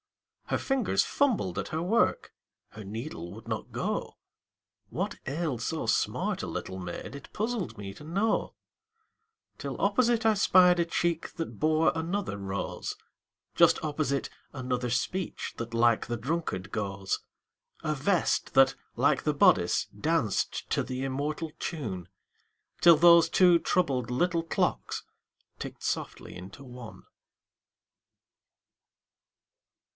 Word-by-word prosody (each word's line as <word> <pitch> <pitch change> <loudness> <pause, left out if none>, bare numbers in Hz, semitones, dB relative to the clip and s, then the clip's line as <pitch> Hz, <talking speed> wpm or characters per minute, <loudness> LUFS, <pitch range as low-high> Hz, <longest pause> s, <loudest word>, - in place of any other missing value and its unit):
Her - - 0
fingers 270 -6 +1
fumbled 235 - +1
at - - -4
her 160 - -2
work, 200 +7 +1 0.4
Her 110 - -10
needle 100 - -6
would 110 +3 -11
not - - -4
go; - - -3 0.7
What - - -2
ailed 140 -4 -2
so 155 +2 -2
smart 110 - 0
a - - -4
little 95 - -5
maid 90 +8 -6
It 140 - -11
puzzled 210 - -2
me 100 -1 -6
to 105 - -13
know, 195 +8 0 1.0
Till - - -5
opposite 240 -2 +2
I 220 - +6
spied 180 -3 +5
a 170 - +3
cheek 170 0 -1
That 165 - -5
bore 155 +1 +3
another 170 - -2
rose; 100 -1 -4 0.6
Just - - +5
opposite, 145 -2 -1 0.2
another 125 -2 -2
speech 170 +10 -2
That 115 0 -6
like 115 -1 +3
the 120 0 -2
drunkard 115 - -3
goes; 100 -2 -2 0.6
A 155 - 0
vest 170 +5 +1
that, 135 0 +6 0.2
like - - +3
the - - +1
bodice, - - +4
danced - - 0
To - - +2
the 130 +1 -4
immortal 150 +4 -3
tune, 100 - -4 0.7
Till 170 -2 +8
those 170 +1 +7
two 180 -2 +5
troubled 135 -12 0
little 170 +6 +1
clocks 165 - -1 0.6
Ticked - - -7
softly - - -3
into 95 +10 -10
one. 125 -3 -10
145 Hz, 125 wpm, -29 LUFS, 115-175 Hz, 1.0 s, Till